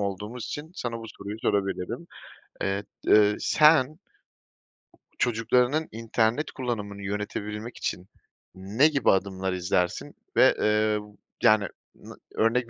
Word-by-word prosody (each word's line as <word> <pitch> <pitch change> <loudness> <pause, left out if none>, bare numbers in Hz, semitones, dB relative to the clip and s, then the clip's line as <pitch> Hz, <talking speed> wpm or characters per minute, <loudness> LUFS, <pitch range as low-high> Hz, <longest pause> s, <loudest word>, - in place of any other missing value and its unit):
olduğumuz 105 +4 -4
için 150 +6 -6
sana 115 -8 -4
bu 115 - -9
soruyu 100 +2 -6
sorabilirim. 100 - -1 0.6
Eee, 100 +1 -1 0.2
eee, 105 -1 +5
sen 155 0 +4 1.2
çocuklarının 125 +6 +2
internet 115 +4 0
kullanımını 105 -6 -4
yönetebilmek 105 +3 -4
için 90 +2 -4 0.5
ne 100 +10 +3
gibi 140 -6 +3
adımlar 95 -1 -1
izlersin 90 -1 -1 0.2
ve, - - +6
eee, 105 0 +2 0.4
yani, 110 -1 +5 0.3
na - - -12 0.2
örnek 115 +2 +2
110 Hz, 110 wpm, -26 LUFS, 100-125 Hz, 1.2 s, ve